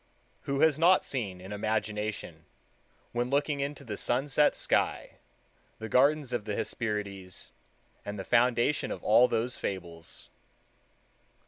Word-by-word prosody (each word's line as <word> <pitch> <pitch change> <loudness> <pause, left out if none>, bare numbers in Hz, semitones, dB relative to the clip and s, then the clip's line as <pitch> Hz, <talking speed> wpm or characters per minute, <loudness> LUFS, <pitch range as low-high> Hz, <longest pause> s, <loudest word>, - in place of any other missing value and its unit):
Who 140 0 0
has 155 -2 +4
not 180 +3 +5
seen 100 -9 -3
in 95 +2 -10
imagination, 105 -4 -3 0.7
when 120 +1 -1
looking 145 +1 +1
into 140 +1 -3
the 110 -5 -5
sunset 140 +6 +2
sky, - - 0 0.6
the 110 - -6
gardens 140 +2 +3
of 115 -4 -2
the 105 - -2
Hesperides, 100 -4 -4 0.5
and 105 0 -5
the 95 - -4
foundation 120 +5 +2
of - - -5
all 120 +4 +6
those 120 +2 -1
fables? 85 -4 -6
115 Hz, 125 wpm, -29 LUFS, 105-140 Hz, 0.7 s, all